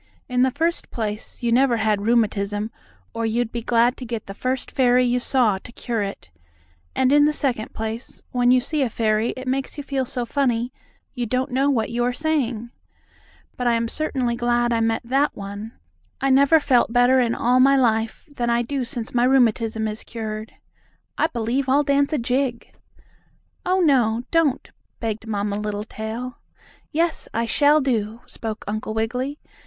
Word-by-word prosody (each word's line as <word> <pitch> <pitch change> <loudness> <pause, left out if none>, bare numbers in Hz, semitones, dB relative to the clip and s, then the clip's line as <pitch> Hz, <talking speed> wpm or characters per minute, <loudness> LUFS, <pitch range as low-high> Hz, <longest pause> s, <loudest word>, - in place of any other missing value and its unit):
In 250 -1 +1
the 260 - +5
first 325 +6 -1
place, 215 +1 -5
you 235 - +1
never 245 0 +4
had 215 -1 0
rheumatism, 210 -2 +1 0.4
or 230 - -3
you'd 225 +1 0
be 235 - -3
glad 240 +2 +2
to - - -7
get 230 -2 -4
the 195 - -7
first 255 +4 -3
fairy 250 -1 +3
you 245 0 +2
saw 240 -6 +2
to 235 - -12
cure 235 -2 -3
it. 195 - -6 0.6
And 260 +1 +3
in 290 0 +6
the 300 - +3
second 250 -7 -1
place, 220 +2 -5
when 245 -1 +2
you 255 0 +5
see 300 +3 -2
a 260 - +1
fairy 220 0 +1
it 260 0 -7
makes 265 +3 -2
you 290 - -4
feel 275 -1 -1
so 250 -2 -3
funny 245 -2 0 0.4
you 245 -2 -3
don't 255 +3 -1
know 270 +3 +2
what 235 -5 0
you 240 +1 0
are 245 +1 +1
saying. 250 -6 -1 0.8
But 250 - -2
I 240 - +4
am 230 0 0
certainly 255 -3 -1
glad 240 0 +1
I 230 - +1
met 225 0 0
that 275 +4 +1
one. 205 +3 -7 0.5
I 270 0 +1
never 280 +4 +6
felt 250 -6 +2
better 245 +2 +4
in 235 -2 +1
all 250 +2 +2
my 275 +2 +6
life 225 -3 +1
than 245 -5 -3
I 235 0 +2
do 270 +2 -2
since 235 -1 -5
my 240 0 +3
rheumatism 230 -4 +2
is 215 0 -5
cured. 220 -1 -6 0.6
I - - +2
believe 245 +1 -1
I'll 285 +3 +4
dance 280 +1 +2
a 305 - +1
jig." 250 0 -1 0.9
"Oh, 370 +1 +3
no, 245 -7 +3
don't," 325 -5 +1 0.3
begged 225 -1 -4
Mamma 205 -1 -1
Littletail. 220 +3 -5 0.5
"Yes, 330 +1 0
I 230 +1 +1
shall 290 +4 +4
to," 225 -3 -1
spoke 220 -1 -6
Uncle 215 +1 -3
Wiggily. 250 +6 -2
240 Hz, 180 wpm, -23 LUFS, 225-265 Hz, 0.9 s, in